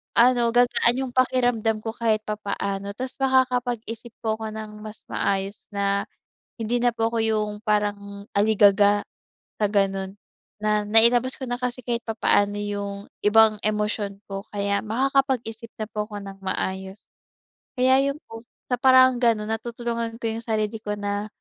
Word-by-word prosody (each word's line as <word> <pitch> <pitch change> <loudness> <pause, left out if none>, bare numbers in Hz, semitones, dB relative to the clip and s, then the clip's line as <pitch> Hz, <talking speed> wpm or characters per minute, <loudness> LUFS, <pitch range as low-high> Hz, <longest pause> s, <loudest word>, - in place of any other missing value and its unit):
ano, 240 -1 +5
gagaan 245 0 +3
yung 260 -2 -4
pakiramdam 245 -4 +2
ko 225 - -3
kahit 220 -2 +1
papaano. 200 -1 -3
Ta's 255 0 -5
makakapag-isip 245 -3 0
po 220 -1 0
ako 220 -1 -4
ng 215 0 -6
mas 215 0 -9
maayos 195 +1 -1 0.2
na, 200 0 0 0.6
hindi 230 +2 0
na 245 0 +3
po 225 0 +1
ako 230 - 0
yung 215 -1 0
parang 205 -2 -1
aligaga 205 -1 +5 0.6
sa - - +3
ganun, 195 -1 0 0.5
na 210 0 +2
nailabas 235 +4 +4
ko 260 - -4
na 245 - -1
kasi 250 0 -3
kahit 235 -1 -2
papaano 205 -2 +1
yung 200 0 -4 0.2
ibang 215 +1 +6
emosyon 210 -1 -1
ko. 195 0 -5
Kaya 200 -1 0
makakapag-isip 240 -1 0
na 215 - -2
po 210 0 -2
ako 205 -2 -6
ng 195 0 -9
maayos. 190 +1 -3 0.8
Kaya 260 +1 +5
yun 285 - -13
po, 225 0 -8 0.3
sa 250 - +2
paraang 260 -1 +6
ganun 220 -2 +2
natutulungan 235 0 -3
ko 225 - -1
yung 230 - -9
sarili 220 -1 -1
ko 210 -1 -2
na 205 0 -2
220 Hz, 150 wpm, -24 LUFS, 205-240 Hz, 0.8 s, ibang